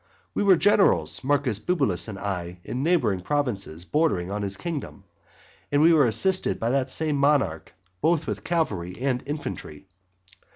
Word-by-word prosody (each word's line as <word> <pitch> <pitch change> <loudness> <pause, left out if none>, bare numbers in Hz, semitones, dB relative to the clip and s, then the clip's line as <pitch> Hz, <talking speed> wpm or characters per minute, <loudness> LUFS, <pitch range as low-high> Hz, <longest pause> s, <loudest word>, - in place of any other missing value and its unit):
We - - -1
were 200 -2 +6
generals, 120 - +3
Marcus 135 -6 +1
Bibulus 135 - 0
and 105 -3 -6
I, 90 -3 -4
in 125 - -4
neighbouring 130 - +1
provinces 100 - -2
bordering 120 - 0
on 105 +1 -3
his 100 -1 -3
kingdom; 165 - -6 0.7
and 145 - +3
we 165 +3 +6
were 150 -4 +5
assisted 185 - +1
by 115 +1 0
that 135 -1 0
same 150 +1 -1
monarch 140 - +1 0.3
both 165 -1 +2
with - - -4
cavalry 100 - -2
and 130 -1 0
infantry. 95 - -6
130 Hz, 155 wpm, -25 LUFS, 95-155 Hz, 0.7 s, were